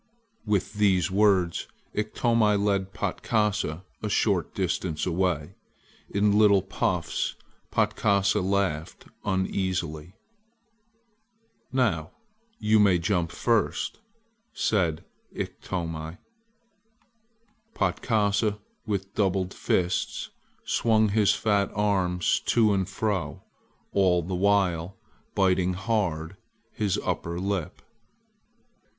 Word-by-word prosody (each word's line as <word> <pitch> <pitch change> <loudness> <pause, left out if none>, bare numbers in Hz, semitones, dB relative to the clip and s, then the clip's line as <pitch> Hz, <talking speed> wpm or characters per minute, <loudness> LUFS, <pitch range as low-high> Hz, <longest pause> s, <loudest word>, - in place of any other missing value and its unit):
With 100 -2 0
these 100 -3 +2
words 95 -4 +2 0.3
Iktomi 110 0 +2
led 100 -1 0
Patkasa 105 -9 -1 0.2
a 105 - -2
short 100 -5 +1
distance 90 -4 -1
away. 90 -2 0 0.6
In 105 +1 +2
little 100 -3 +5
puffs 95 -3 -1 0.3
Patkasa 100 -1 +2
laughed 95 -5 -1 0.2
uneasily. 95 -3 -2 1.6
"Now, 100 -12 0 0.4
you 110 0 +3
may 100 -4 +5
jump 85 -1 0
first," 115 -3 0 0.5
said 85 -7 0 0.3
Iktomi. 80 -2 -4 1.6
Patkasa, 105 -2 +1 0.3
with 100 -2 -3
doubled 95 -2 0
fists, 90 -1 -1 0.3
swung 110 -2 +3
his 105 0 +3
fat 100 -2 +1
arms 95 -4 +1
to 110 -3 +4
and 95 -2 0
fro, 95 -8 -2 0.5
all 90 -3 +3
the 90 +3 -5
while 95 -2 +1 0.4
biting 95 -1 +2
hard 95 -4 -1 0.3
his 100 -3 0
under 85 +1 -2
lip. 95 -3 -3
95 Hz, 85 wpm, -26 LUFS, 90-105 Hz, 1.6 s, little